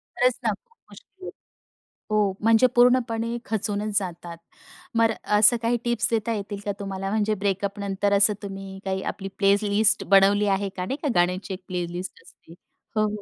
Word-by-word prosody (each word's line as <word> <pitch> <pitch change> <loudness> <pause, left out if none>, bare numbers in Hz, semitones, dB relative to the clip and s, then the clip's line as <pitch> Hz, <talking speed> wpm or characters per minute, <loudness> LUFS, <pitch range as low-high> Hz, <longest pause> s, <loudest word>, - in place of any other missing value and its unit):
खरंच 250 0 +3
ना, 230 - +2 0.4
मुश्किल. 375 -1 -12 0.8
हो, 210 -2 +2
म्हणजे 225 +3 +5
पूर्णपणे 240 -2 +2
खचूनच 210 -1 -2
जातात. 175 -3 -4 0.6
मग 225 0 +4 0.3
असं 215 +3 +6
काही 235 +1 +1
टिप्स 235 -1 0
देता 230 0 0
येतील 205 -1 -5
का 205 - 0
तुम्हाला? 195 -1 -4
म्हणजे 215 0 +1
ब्रेकअपनंतर 200 0 -1
असं 205 +1 +4
तुम्ही 195 -1 -7
काही 190 0 -2
आपली 195 - -8
प्लेलिस्ट 205 +1 +2
बनवली 200 +1 +5
आहे 195 0 0
का? 180 -1 -5
नाही 265 +9 -3
का, - - 0
गाण्याची 180 +3 0
एक 185 0 -9
प्लेलिस्ट 180 0 -5
असते. 165 - -18 0.4
हो, 215 0 +3
हो. 210 0 -5
205 Hz, 155 wpm, -24 LUFS, 195-225 Hz, 0.8 s, असं